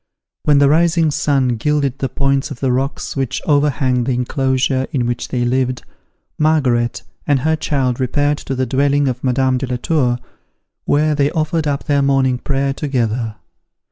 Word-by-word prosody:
When 145 -1 +4
the 140 0 +5
rising 165 +1 +3
sun 135 -5 +1
gilded 140 +1 0
the 135 - -1
points 135 +3 0
of 140 -5 -8
the 135 -2 0
rocks 135 +3 -2
which 135 -2 -2
overhang 140 -4 +1
the 130 - 0
enclosure 130 +1 0
in 125 -4 0
which 120 0 -2
they 120 -1 -1
lived, 130 0 0 0.6
Margaret 130 -7 +1 0.2
and 140 -3 +2
her 160 +3 +2
child 135 -5 -1
repaired 145 +3 0
to 135 - -4
the 130 0 0
dwelling 140 +3 +1
of 125 -1 -3
Madame 130 0 +1
de 135 - -3
la 125 0 -2
Tour, 125 -3 +1 0.7
where 150 +1 +2
they 145 -1 +2
offered 160 -1 -1
up 140 -1 -1
their 145 -2 +1
morning 135 -2 +2
prayer 135 0 -1
together. 120 -6 -2
135 Hz, 170 wpm, -18 LUFS, 125-145 Hz, 0.7 s, the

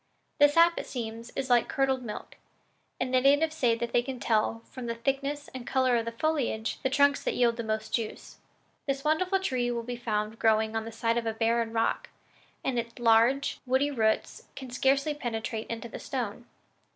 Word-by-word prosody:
The 290 0 +8
sap, 335 +3 +4
it - - -6
seems, 230 -1 -5
is 265 -2 -2
like 240 -2 +4
curdled 265 -1 +1
milk, 225 -4 -8 0.6
and 255 0 -2
the 255 - +4
natives 290 +4 +3
say 240 -6 +2
that 235 +1 -4
they 240 - +4
can 255 0 -6
tell, 225 0 0
from 255 -2 -8
the 230 - -2
thickness 275 +4 -2
and 255 -2 -7
color 260 -2 +2
of 230 -1 0
the 230 - -3
foliage, 240 -4 -1
the 265 - +1
trunks 285 +1 +3
that - - -1
yield 235 -2 +3
the 235 - -4
most 220 0 -3
juice. 225 -3 -4 0.5
This 275 0 -1
wonderful 365 +5 +2
tree 255 -10 -1
will 235 -1 -2
be 245 +1 -4
found 220 -2 -2
growing 220 0 +2
on 225 0 -1
the 225 - -6
side 230 +1 0
of 230 - -5
a 225 - 0
barren 230 0 +1
rock, 225 0 0 0.6
and 250 -3 +1
its 235 0 -6
large, 240 +3 +3
woody 265 +3 +2
roots 220 -5 0
can 260 -2 -8
scarcely 275 +4 +2
penetrate 225 -5 -4
into 230 0 -4
the - - -8
stone. 240 -3 -4
240 Hz, 200 wpm, -28 LUFS, 225-270 Hz, 0.6 s, The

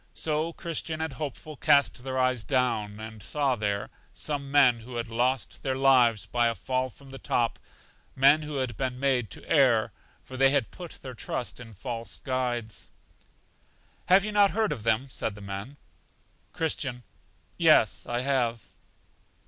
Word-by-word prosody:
So 155 +1 0
Christian 165 -2 -3
and 160 -3 -3
Hopeful 150 +2 -6
cast 140 -2 +3
their 130 0 -3
eyes 130 -2 +2
down, 115 -5 0
and 110 -1 -9
saw 140 +3 0
there 105 -2 -2 0.2
some 140 - -3
men 135 -4 +5
who 120 +2 -10
had 115 -1 -3
lost 125 +2 -1
their 130 -1 -1
lives 125 -6 +4
by 120 -1 +1
a 115 - 0
fall 130 +1 -1
from 135 +2 -16
the 135 - -8
top; 120 -1 0 0.6
men 140 +3 +5
who 150 -1 -6
had 130 -4 -2
been 130 0 -3
made 130 -5 +1
to 80 - -9
err, 130 -8 +4 0.3
for 130 - -9
they 135 0 +6
had 140 -4 +1
put 175 -2 -9
their 130 -1 -7
trust 120 +1 -4
in 115 -3 -11
false 115 -1 -5
guides. 125 -4 -3 1.2
Have 190 +2 +5
you 215 - -3
not 205 -1 +5
heard 220 0 +1
of 135 -7 -3
them? 115 +4 +1
said 110 -5 -4
the - - -11
men. 100 +8 -7 0.7
Christian. 130 -6 -2 0.6
Yes, - - +4
I 120 0 -1
have. 120 -8 0
130 Hz, 165 wpm, -27 LUFS, 115-140 Hz, 1.2 s, they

